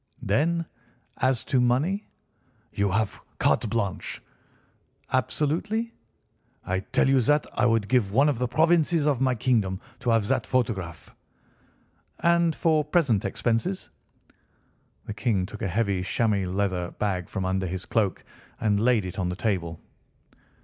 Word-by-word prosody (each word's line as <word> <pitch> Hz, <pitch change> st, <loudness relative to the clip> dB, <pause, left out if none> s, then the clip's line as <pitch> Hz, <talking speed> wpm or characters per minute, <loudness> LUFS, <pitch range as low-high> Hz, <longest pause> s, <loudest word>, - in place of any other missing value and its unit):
"Then, 165 Hz, +11 st, +1 dB, 0.5 s
as 130 Hz, -2 st, +1 dB
to 130 Hz, -, +1 dB
money?" 145 Hz, +12 st, +1 dB, 0.6 s
"You 100 Hz, 0 st, +1 dB
have 105 Hz, +1 st, -1 dB, 0.2 s
carte 115 Hz, -, +2 dB
blanche." 100 Hz, -4 st, -2 dB, 0.9 s
"Absolutely?" 170 Hz, -, 0 dB, 0.7 s
"I 95 Hz, +1 st, 0 dB
tell 95 Hz, -, +1 dB
you 135 Hz, -1 st, +4 dB
that 150 Hz, +5 st, +2 dB
I 120 Hz, -, +2 dB
would 115 Hz, -3 st, +1 dB
give 120 Hz, -6 st, +2 dB
one 135 Hz, +7 st, +4 dB
of 140 Hz, -6 st, 0 dB
the 125 Hz, -, 0 dB
provinces 160 Hz, +3 st, +3 dB
of 140 Hz, -4 st, +1 dB
my 130 Hz, -1 st, +2 dB
kingdom 110 Hz, -7 st, +1 dB, 0.2 s
to 120 Hz, -, -2 dB
have 115 Hz, -3 st, +3 dB
that -, -, 0 dB
photograph." 100 Hz, -10 st, -2 dB, 1.1 s
"And 170 Hz, -1 st, +3 dB
for 155 Hz, -2 st, +2 dB
present 145 Hz, -, +1 dB
expenses?" 120 Hz, -, -1 dB, 1.1 s
The 105 Hz, -, -5 dB
King 105 Hz, -4 st, 0 dB
took 105 Hz, +2 st, -9 dB
a 105 Hz, -, 0 dB
heavy 100 Hz, -1 st, 0 dB
chamois 100 Hz, 0 st, 0 dB
leather 95 Hz, -2 st, -1 dB
bag 95 Hz, -4 st, -2 dB
from 95 Hz, -3 st, -3 dB
under 95 Hz, 0 st, 0 dB
his 90 Hz, +1 st, -5 dB
cloak 105 Hz, -5 st, 0 dB, 0.4 s
and 105 Hz, -2 st, +2 dB
laid 115 Hz, -3 st, +3 dB
it 90 Hz, +1 st, -6 dB
on 90 Hz, -1 st, 0 dB
the 90 Hz, -, -3 dB
table. 90 Hz, -6 st, -2 dB
115 Hz, 145 wpm, -26 LUFS, 95-140 Hz, 1.1 s, you